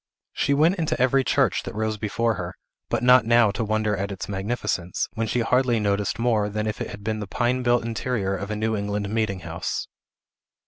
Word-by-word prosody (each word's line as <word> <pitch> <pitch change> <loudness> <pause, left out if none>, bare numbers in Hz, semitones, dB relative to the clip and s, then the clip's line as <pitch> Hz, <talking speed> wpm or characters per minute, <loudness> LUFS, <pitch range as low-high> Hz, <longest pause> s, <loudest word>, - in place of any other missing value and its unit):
She 140 - +1
went 165 +7 +3
into 160 - -1
every 130 +2 +3
church - - +2
that - - -7
rose 110 0 -1
before 115 +2 0
her, 90 -2 -5 0.3
but 120 0 -1
not 125 0 +7
now 115 -2 +4
to 115 - -2
wonder 110 -1 0
at 100 +1 -3
its 95 - -5
magnificence, 95 -3 -2
when 115 -1 -2
she 120 - 0
hardly 125 0 +2
noticed 100 -1 0
more 110 -3 +1
than 105 +1 -2
if 105 -1 -3
it - - -3
had 100 - -9
been 110 0 -2
the 105 - -5
pine 125 +4 0
built 120 -1 +2
interior 115 -4 -1
of 100 +1 -5
a 105 - -2
New 110 +1 0
England 100 0 -2
meeting 110 -4 -1
house. 85 +1 -4
110 Hz, 210 wpm, -24 LUFS, 100-120 Hz, 0.3 s, not